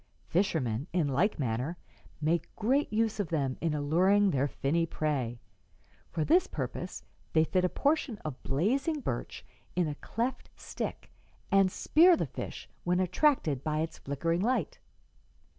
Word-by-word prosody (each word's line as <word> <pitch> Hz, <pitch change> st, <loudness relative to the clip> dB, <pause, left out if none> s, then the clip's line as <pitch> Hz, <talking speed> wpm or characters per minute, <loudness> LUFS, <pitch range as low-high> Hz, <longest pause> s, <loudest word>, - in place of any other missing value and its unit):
Fishermen, 150 Hz, -, 0 dB
in 170 Hz, -5 st, +2 dB
like 175 Hz, +11 st, +1 dB
manner, 130 Hz, +5 st, -2 dB, 0.4 s
make 160 Hz, +1 st, 0 dB
great 265 Hz, +7 st, +1 dB
use 220 Hz, 0 st, +1 dB
of 200 Hz, -, 0 dB
them 140 Hz, -5 st, 0 dB
in 165 Hz, -2 st, 0 dB
alluring 185 Hz, +7 st, +3 dB
their 140 Hz, 0 st, +1 dB
finny 145 Hz, +4 st, 0 dB
prey. 135 Hz, -7 st, -2 dB, 0.7 s
For 160 Hz, -2 st, -1 dB
this 360 Hz, +3 st, +4 dB
purpose -, -, -5 dB, 0.3 s
they 160 Hz, -, +5 dB
fit 180 Hz, +3 st, +1 dB
a 180 Hz, -, +3 dB
portion 285 Hz, -, 0 dB
of 145 Hz, -5 st, -5 dB
blazing 265 Hz, -, 0 dB
birch -, -, -4 dB, 0.3 s
in 180 Hz, -3 st, +2 dB
a 150 Hz, -, -2 dB
cleft 235 Hz, -, -3 dB
stick -, -, -6 dB, 0.4 s
and 195 Hz, -1 st, +5 dB
spear 340 Hz, -, +5 dB
the -, -, 0 dB
fish -, -, -7 dB, 0.2 s
when 180 Hz, +1 st, +1 dB
attracted 180 Hz, -, +2 dB
by 155 Hz, 0 st, 0 dB
its 160 Hz, 0 st, -4 dB
flickering 165 Hz, +5 st, -1 dB
light.'" 250 Hz, +5 st, 0 dB
170 Hz, 145 wpm, -30 LUFS, 145-210 Hz, 0.7 s, they